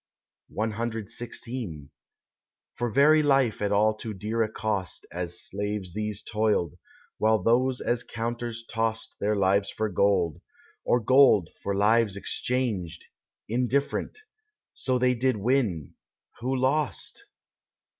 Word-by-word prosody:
CXVI 110 Hz, -, -4 dB, 0.8 s
For 120 Hz, 0 st, -2 dB
very 150 Hz, +6 st, +5 dB
life 135 Hz, -7 st, +2 dB
at 100 Hz, -1 st, 0 dB
all 105 Hz, +2 st, +4 dB
too 110 Hz, 0 st, -7 dB
dear 110 Hz, +4 st, -2 dB
a 110 Hz, -1 st, 0 dB
cost 105 Hz, -5 st, -3 dB
As 90 Hz, 0 st, -4 dB
slaves 100 Hz, -2 st, -4 dB
these 105 Hz, 0 st, -3 dB
toiled, 105 Hz, -7 st, 0 dB, 0.4 s
while 110 Hz, 0 st, +4 dB
those 125 Hz, +5 st, +2 dB
as 120 Hz, 0 st, 0 dB
counters 115 Hz, 0 st, -4 dB
tost 110 Hz, 0 st, -2 dB
Their 105 Hz, +1 st, +1 dB
lives 100 Hz, 0 st, +2 dB
for 110 Hz, 0 st, -2 dB
gold, 90 Hz, -4 st, +1 dB, 0.4 s
or 120 Hz, -, +3 dB
gold 125 Hz, -, +5 dB
for 100 Hz, -, -2 dB
lives 105 Hz, 0 st, +3 dB
exchanged, 100 Hz, -8 st, -2 dB, 0.4 s
Indifferent, 125 Hz, -, -1 dB, 0.6 s
so 130 Hz, -1 st, 0 dB
they 125 Hz, 0 st, +3 dB
did 125 Hz, -1 st, +1 dB
win, 105 Hz, -, 0 dB, 0.5 s
who 130 Hz, +3 st, -1 dB
lost. 135 Hz, +3 st, -1 dB
110 Hz, 115 wpm, -27 LUFS, 100-125 Hz, 0.8 s, very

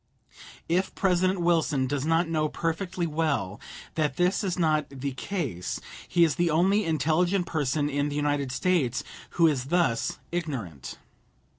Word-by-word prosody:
If 180 Hz, +3 st, 0 dB
President 185 Hz, 0 st, +2 dB
Wilson 160 Hz, -6 st, +2 dB
does 140 Hz, +2 st, -2 dB
not 165 Hz, +1 st, +3 dB
know 155 Hz, -2 st, 0 dB
perfectly 170 Hz, +2 st, -2 dB
well 150 Hz, -, -1 dB, 0.3 s
that 150 Hz, -4 st, 0 dB
this 180 Hz, +4 st, +2 dB
is 185 Hz, -2 st, -1 dB
not 155 Hz, -4 st, +2 dB
the 140 Hz, 0 st, -4 dB
case, 130 Hz, -, -3 dB, 0.3 s
he 170 Hz, -, +4 dB
is 160 Hz, -1 st, +2 dB
the 175 Hz, -1 st, +2 dB
only 190 Hz, +6 st, +3 dB
intelligent 165 Hz, +4 st, +1 dB
person 145 Hz, -2 st, 0 dB
in 145 Hz, 0 st, 0 dB
the 145 Hz, -, -4 dB
United 145 Hz, -2 st, 0 dB
States 135 Hz, -4 st, +1 dB, 0.3 s
who 170 Hz, -, +6 dB
is 140 Hz, -6 st, +2 dB
thus 155 Hz, -7 st, +1 dB
ignorant. 120 Hz, -, -4 dB
160 Hz, 145 wpm, -27 LUFS, 140-175 Hz, 0.3 s, who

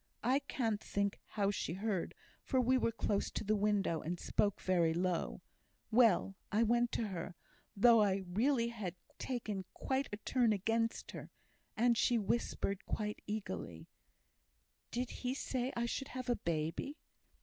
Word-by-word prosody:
(I 255 Hz, +4 st, +3 dB
can't 230 Hz, -6 st, -2 dB
think 200 Hz, 0 st, -1 dB
how 200 Hz, -2 st, 0 dB
she 170 Hz, -, -2 dB
heard, 195 Hz, -1 st, -2 dB, 0.3 s
for 260 Hz, -, +1 dB
we 255 Hz, +1 st, +4 dB
were 235 Hz, -2 st, +2 dB
close 205 Hz, -3 st, 0 dB
to -, -, -4 dB
the 215 Hz, +1 st, +2 dB
window, 200 Hz, -5 st, +1 dB
and 175 Hz, +2 st, -3 dB
spoke 205 Hz, -2 st, +1 dB
very 170 Hz, -3 st, +2 dB
low.) 180 Hz, -1 st, -1 dB, 0.5 s
Well, 220 Hz, -5 st, +5 dB, 0.2 s
I 215 Hz, +3 st, +3 dB
went 240 Hz, +1 st, +3 dB
to 220 Hz, -3 st, -1 dB
her, 175 Hz, -1 st, -5 dB, 0.4 s
though 230 Hz, +1 st, +7 dB
I 195 Hz, -2 st, +2 dB
really 235 Hz, +6 st, +2 dB
had 205 Hz, -7 st, -5 dB, 0.2 s
taken 215 Hz, -6 st, -3 dB
quite 270 Hz, +1 st, -1 dB
a 205 Hz, -, -3 dB
turn 235 Hz, 0 st, +2 dB
against 225 Hz, +3 st, 0 dB
her. -, -, -8 dB, 0.5 s
And 235 Hz, +1 st, +4 dB
she 240 Hz, +1 st, +3 dB
whispered, 205 Hz, -2 st, -1 dB
quite 210 Hz, -1 st, -2 dB
eagerly, 210 Hz, 0 st, -4 dB, 1.0 s
'Did 245 Hz, +1 st, -2 dB
he 255 Hz, +1 st, -1 dB
say 260 Hz, -2 st, -2 dB
I 235 Hz, -, +1 dB
should 270 Hz, +3 st, -2 dB
have 255 Hz, 0 st, -5 dB
a -, -, +3 dB
baby?' 165 Hz, -, -2 dB
215 Hz, 155 wpm, -35 LUFS, 195-240 Hz, 1.0 s, though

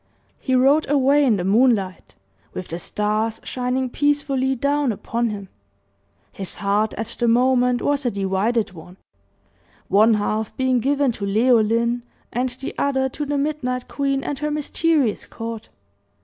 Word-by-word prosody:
He 260 Hz, -, 0 dB
rode 275 Hz, +4 st, +3 dB
away 285 Hz, +1 st, +4 dB
in 245 Hz, -6 st, +3 dB
the 180 Hz, -, -2 dB
moonlight, 200 Hz, -, +1 dB, 0.4 s
with 185 Hz, -, -6 dB
the 170 Hz, -, -4 dB
stars 215 Hz, +3 st, -1 dB
shining 255 Hz, +1 st, -2 dB
peacefully 275 Hz, -1 st, 0 dB
down 280 Hz, +1 st, +1 dB
upon 230 Hz, +2 st, -2 dB
him. 200 Hz, -2 st, -6 dB, 0.8 s
His 190 Hz, -2 st, -5 dB
heart 205 Hz, +2 st, 0 dB
at 225 Hz, +1 st, -4 dB
the 240 Hz, -, +2 dB
moment 250 Hz, +1 st, +3 dB
was 285 Hz, -1 st, +1 dB
a 245 Hz, -, +1 dB
divided 200 Hz, +3 st, 0 dB
one 180 Hz, +2 st, -13 dB, 0.9 s
one 215 Hz, +3 st, +5 dB
half 215 Hz, +1 st, -2 dB
being 260 Hz, -1 st, +2 dB
given 280 Hz, +1 st, +1 dB
to 210 Hz, -3 st, -5 dB
Leoline, 230 Hz, +2 st, +2 dB, 0.3 s
and 250 Hz, +1 st, 0 dB
the 260 Hz, +2 st, -7 dB
other 265 Hz, -1 st, +1 dB
to 290 Hz, +3 st, -5 dB
the 290 Hz, 0 st, -1 dB
Midnight 275 Hz, -4 st, -2 dB
Queen 275 Hz, -1 st, -1 dB
and 285 Hz, -2 st, -4 dB
her 300 Hz, 0 st, -1 dB
mysterious 300 Hz, -4 st, 0 dB
court. 225 Hz, -1 st, -7 dB
245 Hz, 150 wpm, -22 LUFS, 215-275 Hz, 0.9 s, one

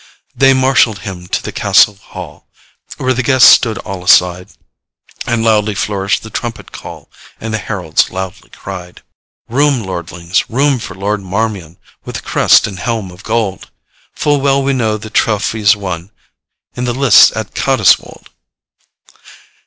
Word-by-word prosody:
'They 135 Hz, 0 st, +4 dB
marshall'd 130 Hz, -4 st, +3 dB
him 90 Hz, -2 st, -8 dB
to -, -, -2 dB
the -, -, -5 dB
castle 105 Hz, -, +3 dB
hall, 100 Hz, -, -12 dB, 0.5 s
Where 130 Hz, 0 st, 0 dB
the 125 Hz, -, -1 dB
guests 130 Hz, 0 st, +6 dB
stood 115 Hz, -2 st, +4 dB
all 95 Hz, -5 st, -7 dB
aside, 90 Hz, 0 st, +3 dB, 0.8 s
And 120 Hz, -2 st, 0 dB
loudly 105 Hz, -2 st, +1 dB
flourished 100 Hz, -1 st, -1 dB
the 110 Hz, -, -10 dB
trumpet 120 Hz, -1 st, -6 dB
call, -, -, -10 dB, 0.3 s
And 110 Hz, 0 st, -5 dB
the 110 Hz, -, -1 dB
heralds 90 Hz, -8 st, -1 dB
loudly 95 Hz, 0 st, -7 dB
cried: 90 Hz, -2 st, -10 dB, 0.4 s
'Room, 135 Hz, 0 st, +1 dB
lordlings, 85 Hz, -1 st, -3 dB
room 135 Hz, +2 st, +1 dB
for 95 Hz, -4 st, -8 dB
Lord 100 Hz, +1 st, -2 dB
Marmion, 95 Hz, -3 st, -3 dB, 0.3 s
With -, -, -8 dB
the -, -, -4 dB
crest -, -, +3 dB
and 95 Hz, -3 st, -7 dB
helm 110 Hz, -3 st, -3 dB
of 90 Hz, +2 st, -15 dB
gold! 110 Hz, -4 st, -2 dB, 0.5 s
Full 145 Hz, -2 st, 0 dB
well 135 Hz, 0 st, +2 dB
we 140 Hz, 0 st, 0 dB
know 110 Hz, -4 st, 0 dB
the 110 Hz, +1 st, -10 dB
trophies 105 Hz, -1 st, +1 dB
won 90 Hz, -3 st, -6 dB, 0.7 s
In 125 Hz, -, -3 dB
the 120 Hz, -1 st, -2 dB
lists 135 Hz, -1 st, +6 dB
at -, -, -5 dB
Cottiswold. -, -, +1 dB
105 Hz, 150 wpm, -14 LUFS, 95-120 Hz, 0.8 s, guests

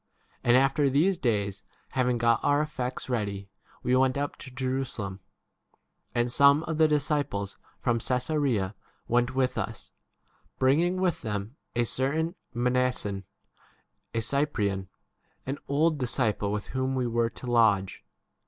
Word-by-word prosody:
And 120 Hz, +1 st, +5 dB
after 135 Hz, +2 st, +3 dB
these 160 Hz, +9 st, +3 dB
days, 105 Hz, -, -1 dB, 0.3 s
having 125 Hz, -2 st, +1 dB
got 115 Hz, 0 st, +3 dB
our 145 Hz, +1 st, +3 dB
effects 130 Hz, -4 st, -4 dB
ready, 100 Hz, -5 st, -3 dB, 0.3 s
we 125 Hz, -, +2 dB
went 130 Hz, +1 st, +3 dB
up 145 Hz, 0 st, -2 dB
to 130 Hz, -, -9 dB
Jerusalem. 130 Hz, -7 st, -3 dB, 1.0 s
16 -, -, +2 dB
And 120 Hz, 0 st, +1 dB
[some] 140 Hz, +5 st, +6 dB
of 160 Hz, -1 st, -3 dB
the 160 Hz, -, +6 dB
disciples 145 Hz, -9 st, -1 dB, 0.2 s
from 120 Hz, -2 st, +1 dB
Cassarea 125 Hz, -5 st, 0 dB, 0.3 s
went 120 Hz, +2 st, +1 dB
with 130 Hz, -1 st, +1 dB
us, 115 Hz, -2 st, -5 dB, 0.7 s
bringing 165 Hz, +8 st, +3 dB
[with 185 Hz, -3 st, +1 dB
them] 105 Hz, +2 st, -4 dB, 0.2 s
a 120 Hz, -, +3 dB
certain 145 Hz, +8 st, 0 dB, 0.2 s
Mnason, 125 Hz, -5 st, 0 dB, 0.9 s
a 115 Hz, -, +1 dB
Cyprian, 105 Hz, -7 st, 0 dB, 0.6 s
an 135 Hz, +2 st, -3 dB
old 155 Hz, +2 st, +2 dB
disciple 115 Hz, -5 st, 0 dB
with 105 Hz, 0 st, -2 dB
whom 130 Hz, 0 st, -1 dB
l? -, -, -1 dB
we 125 Hz, -, +1 dB
were 115 Hz, 0 st, +1 dB
to 125 Hz, -, -10 dB
lodge. 110 Hz, -6 st, +2 dB
125 Hz, 140 wpm, -28 LUFS, 115-140 Hz, 1.0 s, some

